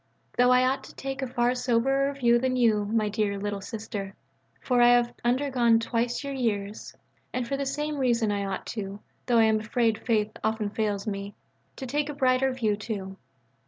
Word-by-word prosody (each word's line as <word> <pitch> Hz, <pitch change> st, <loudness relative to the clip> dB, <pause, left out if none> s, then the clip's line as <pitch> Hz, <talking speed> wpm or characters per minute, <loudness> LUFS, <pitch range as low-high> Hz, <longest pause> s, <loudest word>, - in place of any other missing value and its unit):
Though 245 Hz, 0 st, +4 dB
I 250 Hz, 0 st, +5 dB
ought 265 Hz, +1 st, 0 dB
to -, -, -14 dB
take 270 Hz, 0 st, -5 dB
a 265 Hz, -, -2 dB
far 245 Hz, 0 st, +1 dB
soberer 265 Hz, +3 st, +1 dB
view 240 Hz, -3 st, +3 dB
than 255 Hz, +1 st, 0 dB
you, 220 Hz, -4 st, +3 dB
my 215 Hz, 0 st, 0 dB
dear 205 Hz, -1 st, -1 dB
"Little 200 Hz, 0 st, -3 dB
Sister," 200 Hz, -2 st, -6 dB, 0.4 s
for 250 Hz, -2 st, +1 dB
I 240 Hz, -, +7 dB
have 240 Hz, 0 st, +2 dB
undergone 245 Hz, -2 st, +3 dB
twice 235 Hz, +2 st, -1 dB
your 280 Hz, 0 st, -4 dB
years. 210 Hz, -5 st, -3 dB, 0.4 s
And 250 Hz, -1 st, -2 dB
for 275 Hz, -, -1 dB
the 275 Hz, 0 st, -2 dB
same 295 Hz, +2 st, -2 dB
reason 235 Hz, -4 st, +2 dB
I 200 Hz, -1 st, -1 dB
ought 195 Hz, -1 st, -4 dB
too, 200 Hz, -2 st, -5 dB, 0.3 s
though 240 Hz, -2 st, +3 dB
I 225 Hz, -, +6 dB
am 220 Hz, 0 st, +3 dB
afraid 225 Hz, 0 st, 0 dB
faith 215 Hz, -2 st, 0 dB
often 220 Hz, -1 st, -1 dB
fails 205 Hz, -2 st, -1 dB
me, 200 Hz, -1 st, -4 dB, 0.4 s
to 265 Hz, -, -6 dB
take 290 Hz, +3 st, -1 dB
a 295 Hz, -, -5 dB
brighter 265 Hz, -1 st, +2 dB
view 225 Hz, -5 st, 0 dB
too. 205 Hz, -3 st, -5 dB
235 Hz, 195 wpm, -27 LUFS, 210-255 Hz, 0.4 s, I